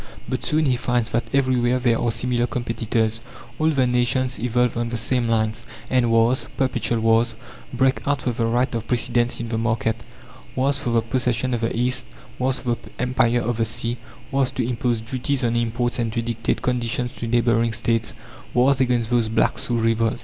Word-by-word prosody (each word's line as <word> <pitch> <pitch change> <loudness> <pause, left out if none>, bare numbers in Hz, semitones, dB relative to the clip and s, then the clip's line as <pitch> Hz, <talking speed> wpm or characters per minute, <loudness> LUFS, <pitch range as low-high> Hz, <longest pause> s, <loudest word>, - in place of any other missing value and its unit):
But - - -3
soon 155 +1 +1
he 130 -3 +2
finds 120 -2 0
that 120 +1 0
everywhere 130 -2 +2
there 120 -2 +2
are 120 - +1
similar 120 +1 0
competitors. 115 -2 -1 0.4
All 155 +1 +3
the 135 -5 +2
nations 125 +1 +1
evolve 125 0 +1
on 120 0 -1
the 120 - -2
same 120 +1 0
lines, 110 -1 0 0.3
and 125 -2 +3
wars, 115 +3 +3
perpetual 130 -3 0
wars, 115 +1 +3 0.4
break 130 +2 +1
out 145 -2 0
for 125 - 0
the 115 -1 -1
right 120 +3 +1
of 115 -1 -3
precedence 120 0 +1
in 115 0 -4
the 115 -1 -1
market. 115 -1 0 0.6
Wars 135 +1 +1
for 125 - -2
the 115 -1 +2
possession 125 +1 0
of 120 - -1
the 115 0 -1
East, 125 +2 0 0.3
wars 130 0 0
for 120 -2 -1
the - - -13
empire 120 -1 +2
of 120 0 -1
the 115 - +1
sea, 115 +2 -2 0.3
wars 135 -1 +2
to 125 -3 -2
impose 120 -2 -1
duties 130 +3 -1
on 120 0 +1
imports 120 +1 0
and 115 -2 0
to 115 - 0
dictate 115 0 -2
conditions 125 0 -1
to 115 - -4
neighbouring 115 0 +2
states; 115 0 -1 0.4
wars 130 +2 +4
against 120 -2 +1
those 120 -2 +2
"blacks" 110 - +1
who 120 - 0
revolt! 115 0 +1
120 Hz, 195 wpm, -22 LUFS, 115-125 Hz, 0.6 s, wars